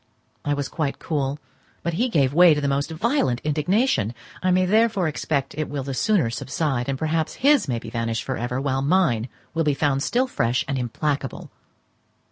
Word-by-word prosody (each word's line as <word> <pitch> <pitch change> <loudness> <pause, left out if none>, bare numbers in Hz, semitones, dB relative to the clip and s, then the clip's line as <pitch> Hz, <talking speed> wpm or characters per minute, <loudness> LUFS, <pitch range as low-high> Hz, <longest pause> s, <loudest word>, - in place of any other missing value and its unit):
I 145 0 0
was 140 -1 -2
quite 150 -4 -2
cool, 140 -3 -2 0.5
but 170 - -1
he 240 +10 +1
gave 140 - +2
way 170 -1 +7
to - - -1
the 140 - -1
most 140 +2 0
violent 160 - 0
indignation; 150 - +1 0.3
I 185 - +1
may 185 0 +3
therefore 215 -2 +3
expect 145 -2 -2
it 155 0 -3
will 145 -2 -3
the 135 0 -4
sooner 170 - +2
subside, 135 +1 -2
and 135 - -1
perhaps 160 +2 -1
his 285 - +5
may 125 -3 -1
be 115 -1 -8
vanished 115 -1 -2
for 130 - -3
ever, 125 +2 -2
while 135 -1 0
mine 140 -7 +2 0.2
will 165 0 +1
be 150 -2 +1
found 140 -1 +1
still 245 - +1
fresh 120 - 0
and 140 -2 -1
implacable. 135 +2 -3
145 Hz, 190 wpm, -23 LUFS, 130-170 Hz, 0.5 s, way